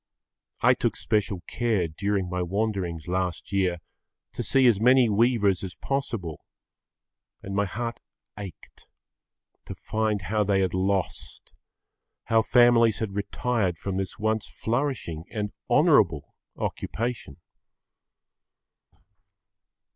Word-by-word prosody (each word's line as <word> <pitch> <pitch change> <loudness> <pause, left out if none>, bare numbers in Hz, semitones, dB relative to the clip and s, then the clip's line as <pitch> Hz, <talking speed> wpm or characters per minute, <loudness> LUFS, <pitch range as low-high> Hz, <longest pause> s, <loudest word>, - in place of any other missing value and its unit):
I - - +6
took - - -1
special 100 -4 -1
care 110 -8 0
during 100 +4 -1
my 90 0 -2
wanderings 90 -3 -2
last 90 -1 -2
year 95 -3 +1 0.6
to - - -4
see 135 -1 +3
as 110 -4 +4
many 125 0 +5
weavers 105 -3 +2
as 95 -2 -6
possible, 115 - -3 1.0
and 95 - -6
my 100 0 +2
heart 115 +5 -4 0.4
ached 100 -5 -11 0.8
to - - -6
find 110 -3 -1
how 105 +4 +1
they 100 -1 +2
had 95 - 0
lost, 95 0 -2 0.7
how 115 0 +3
families 120 -1 +5
had 110 -3 -3
retired 100 -2 -1
from 95 +2 -4
this 95 -1 -3
once 110 +1 -1
flourishing 115 - -2
and 105 -2 -3 0.2
honourable 110 - +3 0.2
occupation. 115 - -4
100 Hz, 110 wpm, -26 LUFS, 95-115 Hz, 1.0 s, I